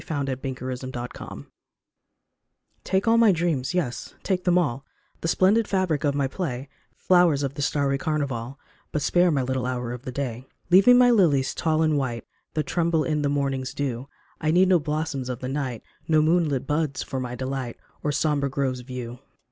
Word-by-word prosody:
104 140 -4 -1 0.4
THE 125 - -10
NEW - - -6
DAWN 120 -1 -7 1.4
TAKE 190 +3 0
all 230 +1 +5
my 225 -3 +6
dreams, 165 -4 -1
yes, 145 -10 -3
take 185 -2 -1
them 180 -1 +4
all, 140 -6 0 0.4
The - - -3
splendid 200 +6 +3
fabric 185 -6 0
of 145 -2 +1
my 140 -1 +1
play, 135 -4 -4 0.3
Flowers 175 -6 +3
of 135 -1 -2
the 145 - -5
starry 140 -1 +1
carnival, 140 -4 -2 0.3
But 150 - -1
spare 175 +3 +3
my 140 -5 +1
little 130 0 -1
hour 125 -2 -3
of 125 +1 -6
day. 125 -1 -4 0.2
Leave 190 +4 +6
me 245 - +10
my 245 0 +6
lilies 145 - +3
tall 160 0 +1
and 155 -2 +2
white 120 -4 -3 0.3
That 155 - 0
tremble 170 -2 +1
in 150 -1 0
the 145 - +1
morning's 135 -2 -1
dew; 135 -1 -3 0.3
I 155 - 0
need 180 +3 +4
no 180 -2 +5
blossoms 150 -4 -3
of 125 - -3
the 130 - -6
night, 130 -5 -3 0.2
No 155 -1 +4
moonlit 155 -5 +2
buds 150 -2 -1
for 135 - -4
my 125 -1 -4
delight 130 -1 -4 0.2
Or 150 - 0
sombre 145 -1 +1
groves 130 -1 -1
of 125 +1 -13
yew. 125 -1 -6
145 Hz, 190 wpm, -25 LUFS, 130-165 Hz, 1.4 s, me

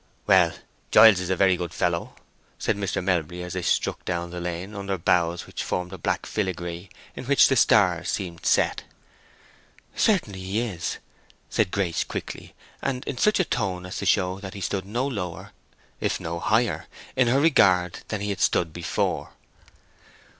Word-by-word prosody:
"Well, - - +4 0.3
Giles 110 -4 +8
is 90 - -4
a 95 - +2
very 95 0 +4
good 90 -1 -5
fellow," 85 -1 -1 0.4
said - - 0
Mr. 100 -2 -2
Melbury, 90 -1 -1
as 90 - -6
they 95 - -2
struck - - 0
down 85 -1 -3
the 90 - -5
lane 90 +3 -4
under 100 -1 -3
boughs 85 0 +1
which - - -5
formed 90 +1 -3
a 95 - -8
black - - -1
filigree 90 -2 -3 0.3
in - - -7
which 140 +2 +6
the 135 - +3
stars 90 -7 +4
seemed 85 -3 -4
set. - - +2 1.1
"Certainly 170 - +1
he 95 +4 -2
is," 100 -8 -3 0.5
said 105 - +2
Grace, 90 -3 0
quickly, - - -7 0.3
and 130 -2 -2
in 125 - -4
such 210 -1 +3
a 185 - +3
tone 95 - -2
as 90 - -6
to 100 - -3
show 95 0 +2
that 100 0 -8
he 100 - -7
stood 95 +1 -2
no 120 +6 -1
lower, 90 -11 -5 0.5
if - - -1
no 85 +1 -4
higher, 110 +5 +1 0.3
in 125 -2 +3
her 130 +3 +3
regard 95 - +4
than 110 -2 -3
he 105 - -2
had 95 - -4
stood 80 -3 +2
before. 85 0 -2
95 Hz, 175 wpm, -25 LUFS, 90-105 Hz, 1.1 s, Giles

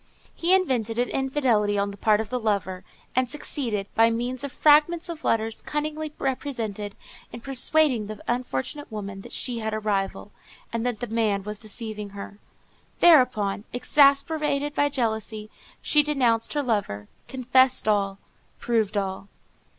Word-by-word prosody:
He 350 +3 +3
invented 245 - 0
an 245 +1 +1
infidelity 255 -7 +1
on 200 0 0
the - - -9
part 210 +1 +3
of 220 +1 -4
the 250 - -1
lover, 200 -4 -1 0.3
and 255 -1 +2
succeeded, 240 -8 -3
by 225 0 +5
means 245 +3 -2
of 280 - -4
fragments 310 +5 +4
of 325 -2 -6
letters 225 0 0
cunningly 305 +1 -3
presented, 235 -8 -4 0.4
in 240 - -8
persuading 270 -2 +2
the 215 0 -7
unfortunate 245 - -3
woman 200 -2 -6
that - - -12
she 245 -2 -2
had 220 -1 -2
a - - -2
rival, 205 -1 -2 0.4
and 230 -1 -1
that 240 -4 -3
the - - -1
man 215 -3 0
was 210 +1 -6
deceiving 215 -1 -5
her. 200 +1 -8 0.6
Thereupon, 250 - +4
exasperated 285 +2 +3
by 290 0 +2
jealousy, 220 -4 -2 0.3
she 300 - +5
denounced 250 -6 +1
her 295 -1 0
lover, 200 - -2 0.2
confessed 260 -1 +2
all, 200 -2 +1 0.4
proved 220 -3 0
all. 190 0 -3
230 Hz, 150 wpm, -25 LUFS, 210-275 Hz, 0.6 s, by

